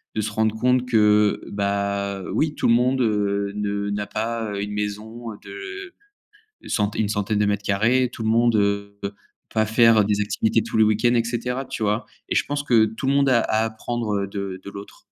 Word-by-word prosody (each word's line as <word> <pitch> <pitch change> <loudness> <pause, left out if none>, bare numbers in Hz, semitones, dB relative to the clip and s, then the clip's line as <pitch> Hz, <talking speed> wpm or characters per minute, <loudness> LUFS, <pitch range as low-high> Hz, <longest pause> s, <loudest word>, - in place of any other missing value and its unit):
de 110 - 0
se 110 +1 -3
rendre 110 0 0
compte 125 +2 +2
que, 105 -3 +3
bah, 100 -1 -1
oui 155 -1 0
tout - - 0
le - - +6
monde, 125 +2 +2
heu, 100 -3 0
ne 100 0 -2
n'a 105 0 -3
pas, 110 -1 -3
heu, 100 - -3
une 105 - -5
maison 105 +3 -5 0.2
de 395 -1 -8 0.8
centaine 105 0 0
une 100 - -1
centaine 105 0 -1
de 105 - +2
mètres 100 0 0
carrés, 115 +6 +2
tout - - -7
le - - 0
monde, 115 0 +3
heu, 100 0 0 0.6
pas 110 0 +3
faire 110 0 +5
des 105 0 0
activités 110 +2 +1
tous - - -4
les 110 - +6
week-ends 110 +3 +2
et 115 -1 +2
cetera, 125 +3 -3
tu 130 -3 -6
vois? 105 +2 0 0.2
Et - - -1
je - - +2
pense 145 0 -2
que 115 -6 +4
tout 110 +5 -4
le 140 - +2
monde 140 -1 +3
à 120 -2 +5
apprendre, 110 0 -1
heu, 100 0 -1
de 100 -2 -5
de 100 - -8
l'autre. 100 0 -11
110 Hz, 205 wpm, -23 LUFS, 100-120 Hz, 0.8 s, le